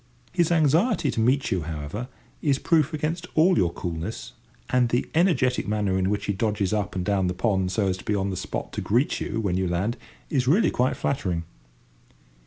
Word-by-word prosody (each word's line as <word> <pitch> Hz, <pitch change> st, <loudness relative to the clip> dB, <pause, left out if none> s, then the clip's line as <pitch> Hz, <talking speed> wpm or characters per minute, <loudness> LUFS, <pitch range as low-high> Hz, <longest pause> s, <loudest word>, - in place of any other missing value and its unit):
His 175 Hz, -2 st, +1 dB
anxiety 165 Hz, -, +3 dB
to -, -, -3 dB
meet 130 Hz, +5 st, +2 dB
you, 95 Hz, -, +1 dB
however, 80 Hz, +8 st, -5 dB, 0.3 s
is 140 Hz, -3 st, +2 dB
proof 155 Hz, 0 st, +2 dB
against 160 Hz, +3 st, -3 dB
all 175 Hz, +4 st, +5 dB
your 90 Hz, -4 st, +2 dB
coolness, 85 Hz, +6 st, -5 dB, 0.4 s
and 125 Hz, -1 st, +3 dB
the 120 Hz, +1 st, 0 dB
energetic 150 Hz, -, +2 dB
manner 105 Hz, -2 st, 0 dB
in 95 Hz, 0 st, +1 dB
which 105 Hz, 0 st, -1 dB
he 100 Hz, -, 0 dB
dodges 105 Hz, -1 st, 0 dB
up 105 Hz, -3 st, -1 dB
and 90 Hz, -1 st, -2 dB
down 95 Hz, -2 st, +1 dB
the 90 Hz, -, -2 dB
pond 95 Hz, -2 st, 0 dB
so 105 Hz, 0 st, +1 dB
as 95 Hz, -1 st, 0 dB
to -, -, -11 dB
be 105 Hz, -, 0 dB
on 100 Hz, 0 st, -1 dB
the -, -, -3 dB
spot -, -, -5 dB
to -, -, -3 dB
greet 120 Hz, +7 st, +1 dB
you 110 Hz, -, -2 dB
when 95 Hz, -5 st, 0 dB
you 95 Hz, -1 st, 0 dB
land 95 Hz, +8 st, -1 dB, 0.3 s
is 130 Hz, -4 st, +1 dB
really 175 Hz, -, +4 dB
quite 125 Hz, +1 st, +1 dB
flattering. 95 Hz, -12 st, -1 dB
110 Hz, 200 wpm, -25 LUFS, 95-140 Hz, 0.4 s, all